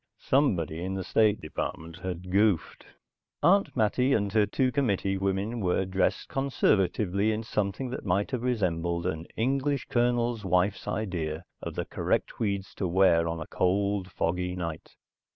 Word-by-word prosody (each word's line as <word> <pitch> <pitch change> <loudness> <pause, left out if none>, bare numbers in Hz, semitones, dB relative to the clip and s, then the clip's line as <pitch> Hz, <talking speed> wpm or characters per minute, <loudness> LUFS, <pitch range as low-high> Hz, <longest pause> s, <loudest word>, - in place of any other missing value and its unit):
Somebody 85 - +1
in 95 +1 -3
the 95 - -3
State 105 +2 +2
Department 80 +1 -5
had 90 0 -5
goofed. 100 -4 +1 0.6
Aunt 195 -4 +4
Mattie 125 +4 +2
and 100 -4 0
her 105 -2 +4
two 130 -2 +1
committee 100 -8 0
women 100 +4 -1
were 95 -1 +1
dressed 95 +1 0
conservatively 105 -6 +1
in 110 +1 -2
something 105 +4 -2
that 130 - -5
might 100 +1 0
have 125 - -2
resembled 85 -8 0
an 80 -2 -3
English 135 +3 0
Colonel's 120 -1 +1
wife's 95 +2 +1
idea 85 -6 -2 0.2
of - - -6
the - - -2
correct - - -1
tweeds 100 -3 -3
to 95 - -1
wear 85 -2 +4
on 85 0 -3
a 80 - -5
cold, 100 +1 0
foggy 90 +1 -1
night. 85 -3 -6
100 Hz, 150 wpm, -28 LUFS, 90-115 Hz, 0.6 s, Aunt